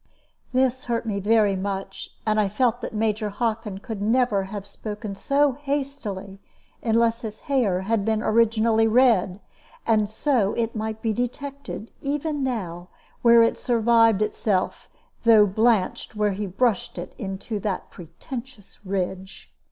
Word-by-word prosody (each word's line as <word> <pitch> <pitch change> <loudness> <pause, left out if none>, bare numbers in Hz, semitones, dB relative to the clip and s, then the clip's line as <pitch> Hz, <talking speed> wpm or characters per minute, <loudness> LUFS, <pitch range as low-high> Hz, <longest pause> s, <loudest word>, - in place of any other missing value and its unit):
This 255 0 +1
hurt 235 -1 -1
me 205 -3 -2
very 210 -1 +3
much, 195 0 -4 0.2
and 215 0 +2
I 205 -2 +2
felt 235 +3 +1
that - - -4
Major 215 0 0
Hockin 215 -1 -2
could 215 0 -6
never 220 -2 +2
have 200 0 -6
spoken 210 0 -6
so 280 +6 +2
hastily 265 -9 -4 0.4
unless 230 0 +2
his 215 -2 -7
hair 230 -10 +1
had 210 +1 0
been 220 +1 0
originally 225 0 +3
red; 220 -6 +3 0.5
and 215 -2 +2
so 220 -3 +1
it 230 0 -2
might 220 0 -4
be 225 -2 +1
detected, 250 0 -5
even 290 +1 -2
now, 180 -9 -3 0.3
where 235 -1 +7
it 230 - +1
survived 230 -3 +3
itself, 210 -2 -1 0.3
though 225 -3 +7
blanched 220 +1 +1
where 210 -1 +1
he 200 +1 -3
brushed 205 +1 0
it 175 - -6
into 195 +2 -4
that 195 -2 -3
pretentious 210 - -10
ridge. 190 0 -4
220 Hz, 140 wpm, -24 LUFS, 200-235 Hz, 0.5 s, where